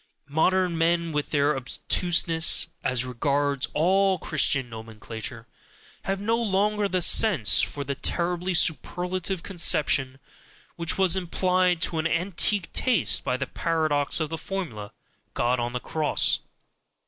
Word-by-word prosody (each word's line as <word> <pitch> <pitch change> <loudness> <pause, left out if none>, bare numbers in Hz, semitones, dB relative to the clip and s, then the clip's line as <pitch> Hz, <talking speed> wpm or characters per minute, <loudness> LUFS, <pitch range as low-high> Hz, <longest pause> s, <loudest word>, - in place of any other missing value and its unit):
Modern 175 +3 +1
men, 170 0 +1
with 150 -1 -3
their 145 0 +1
obtuseness 165 +5 +1
as 125 0 0
regards 140 +2 -1
all 190 +4 +2
Christian 140 -5 +2
nomenclature, 110 0 -8 0.6
have 195 0 -2
no 225 +3 0
longer 210 -1 0
the 185 -2 0
sense 165 - +4
for 145 - -2
the 140 0 -3
terribly 175 +5 -1
superlative 180 +4 -1
conception 145 -7 +1 0.6
which 170 0 -1
was 190 -2 +4
implied 180 -1 0
to 165 - 0
an 160 - 0
antique 180 +2 0
taste 255 -3 +1
by 125 - -1
the 140 - -3
paradox 155 -2 0
of 155 -2 -2
the 165 - -4
formula, 150 - -6 0.4
"God 120 +1 0
on 120 0 -2
the 125 - -4
Cross". 155 +3 0
165 Hz, 130 wpm, -25 LUFS, 140-185 Hz, 0.6 s, sense